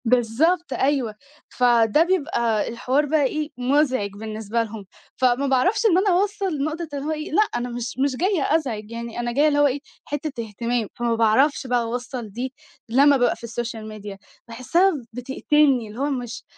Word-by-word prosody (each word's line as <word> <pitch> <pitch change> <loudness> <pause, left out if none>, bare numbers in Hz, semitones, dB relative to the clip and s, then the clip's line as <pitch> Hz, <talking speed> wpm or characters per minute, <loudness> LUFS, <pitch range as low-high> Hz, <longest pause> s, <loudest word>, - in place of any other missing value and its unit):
بالضبط 250 +10 +2
أيوه، 265 -6 0 0.3
فده 240 +2 +4
بيبقى 285 - 0
الحوار 255 +5 0
بقى 300 0 +2
إيه 305 +2 -1
مزعج 255 -4 +1
بالنسبة 220 +2 -3
لهم، 220 -2 -8 0.3
فما 255 +2 +2
باعرفش 375 - +2
إن 370 -5 +5
أنا 390 +2 +3
أوَصّل 390 -7 -1
نقطة 320 +3 -3
اللي 280 0 -4
هو 310 - -1
إيه 305 0 -4
لأ 345 - +4
أنا 245 +1 -2
مش 240 0 -4
مش 280 -2 0
جاية 360 +1 +1
أزعج 225 -9 -2
يعني 235 0 -6
أنا 240 0 -2
جاية 285 +5 +3
اللي 290 -1 +2
هو 290 - +6
إيه 275 +1 -1 0.3
حِتّة 290 -5 -4
اهتمام، 230 +1 -2
فما 235 -1 0
باعرفش 255 +6 +3
بقى 245 -1 +2
أوَصّل 240 0 -5
دي 250 +5 -5 0.4
لمّا 280 +4 +5
بابقى 245 -1 +2
في - - -19
السوشيال 230 -1 -5
ميديا 210 -2 -8 0.3
باحسّها 295 +12 +2 0.2
بتقتلني 265 0 +1
اللي 215 +3 -10
هو 285 +2 0
مش 245 -5 -4
250 Hz, 175 wpm, -23 LUFS, 230-295 Hz, 0.4 s, هو